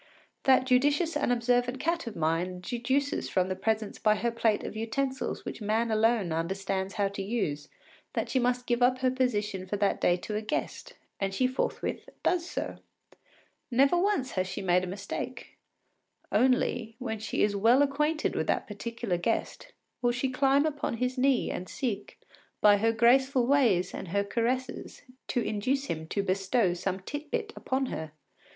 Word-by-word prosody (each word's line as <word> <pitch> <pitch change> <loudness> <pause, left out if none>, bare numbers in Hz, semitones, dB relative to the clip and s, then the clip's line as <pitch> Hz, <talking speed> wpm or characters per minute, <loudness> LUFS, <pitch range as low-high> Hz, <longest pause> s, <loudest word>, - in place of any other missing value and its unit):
That 260 -1 +5
judicious 290 +6 +2
and 290 -4 +1
observant 245 +1 +1
cat 335 -2 -1
of 225 - -5
mine 170 +3 -1
deduces 260 +7 -1
from 185 -1 +1
the 185 - -1
presence 220 +2 -1
by 215 -1 +4
her 235 +2 -1
plate 225 -2 +1
of - - -6
utensils 260 +5 -2
which - - -6
man 220 +2 0
alone 220 -4 +2
understands 190 +4 -2
how 200 -2 +2
to 200 0 -5
use 190 -9 -2 0.4
that - - -1
she 260 - +1
must 250 0 0
give 240 0 0
up 250 +1 +4
her 255 -1 +3
position 210 -7 -1
for 205 - -2
that 200 0 +1
day 175 - +3
to 210 +4 -5
a 210 - -1
guest, 215 - -4 0.2
and 195 -1 -1
she 255 - +2
forthwith 255 +1 -2
does 355 -1 +1
so. - - -4 0.9
Never 275 +5 +4
once 350 -8 +1
has 185 0 -1
she 185 - -5
made 180 0 +3
a - - -3
mistake. 200 +2 -6 0.7
Only, 245 -3 +2
when 225 -4 -4
she 220 - -1
is 205 -1 +2
well 235 +7 +5
acquainted 300 +3 0
with - - -1
the - - +4
particular 225 -2 -4
guest, 230 - -2 0.4
she 245 +2 -1
will - - -7
climb 275 +2 +3
upon 290 -6 -2
his 250 +2 -1
knee 260 -1 +2
and 180 - -5
seek, 215 -6 -4 0.4
by 205 -1 +6
her 225 +3 +2
graceful 250 +3 +4
ways 240 -10 +3
and - - -6
her 200 +4 0
caresses, 240 +5 -2 0.2
to 245 - 0
induce 255 +6 0
him 160 - -4
to 200 +4 -1
bestow 195 +1 +1
some 185 +2 -3
tit 290 +9 -6
bit 430 +5 -2
upon 265 +1 -1
her. 160 - -5
230 Hz, 175 wpm, -29 LUFS, 195-260 Hz, 0.9 s, by